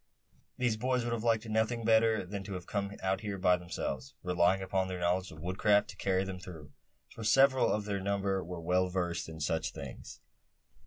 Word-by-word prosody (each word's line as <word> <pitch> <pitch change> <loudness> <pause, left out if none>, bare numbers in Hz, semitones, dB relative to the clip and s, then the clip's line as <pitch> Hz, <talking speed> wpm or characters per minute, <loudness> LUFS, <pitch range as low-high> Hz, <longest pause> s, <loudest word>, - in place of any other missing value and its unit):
These 120 -4 +1
boys 125 +1 0
would 120 0 -1
have 115 -1 -3
liked 115 -1 +2
nothing 110 +1 0
better 110 -2 +4
than 100 +1 -5
to 100 - -6
have 90 -2 -6
come 100 0 -3
out 95 0 0
here 105 -2 -4
by 90 -1 +4
themselves, 70 -6 -5
relying 90 +1 +2
upon 95 0 0
their 90 -1 -4
knowledge 90 +2 0
of 80 +1 -11
woodcraft 100 +3 +2
to - - -14
carry 95 -1 +1
them 95 -1 -5
through; 80 -5 -10 0.4
for 115 - -8
several 135 +3 +5
of 105 -1 -1
their 100 -1 -2
number 100 -1 0
were 90 0 -6
well 90 +2 +1
versed 90 -3 -2
in 80 0 -8
such 80 +2 -1
things. - - -9
95 Hz, 200 wpm, -32 LUFS, 90-110 Hz, 0.4 s, several